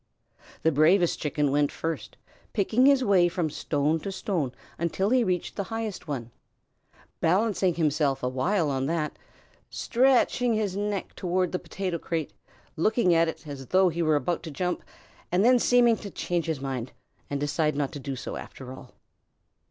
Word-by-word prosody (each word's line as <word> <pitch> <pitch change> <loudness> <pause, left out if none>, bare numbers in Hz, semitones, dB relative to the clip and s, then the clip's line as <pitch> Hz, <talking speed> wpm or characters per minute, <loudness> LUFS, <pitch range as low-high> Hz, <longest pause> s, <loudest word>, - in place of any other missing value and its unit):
The 160 - +4
bravest 165 +4 +3
Chicken 150 -1 0
went 145 0 +2
first, 165 0 -5 0.4
picking 230 +5 +3
his 275 -2 +5
way 190 -6 +4
from 175 -3 -1
stone 150 +2 0
to 195 - -5
stone 185 - -2 0.3
until 190 +5 0
he 255 -1 +4
reached 180 -4 -1
the 200 - -2
highest 225 -5 -5
one, 120 -5 -4 0.9
balancing 190 0 +2
himself 150 -4 +1
awhile 140 +6 +1
on 135 0 -1
that, 155 -1 -1 0.5
stretching 245 -1 +2
his 205 -3 -1
neck 205 -1 -2
toward 180 0 -1
the 180 - -1
potato 185 -4 -4
crate, 160 -2 -3 0.4
looking 215 +1 +3
at 165 0 +4
it 160 -1 -6
as 135 -3 -7
though 185 0 +4
he 170 +1 -3
were 155 -2 +3
about 145 +5 0
to 165 - -7
jump, 180 +4 -2 0.5
and 185 +4 +3
then 250 0 +6
seeming 240 -2 +4
to 205 - -8
change 175 -2 -2
his 160 -4 -1
mind 130 -3 -4 0.4
and 140 - -2
decide 150 +1 0
not 140 -2 -1
do 140 -2 -5
so 125 - -6
after 130 -1 -9
all. 130 -1 -13
170 Hz, 165 wpm, -27 LUFS, 145-200 Hz, 0.9 s, then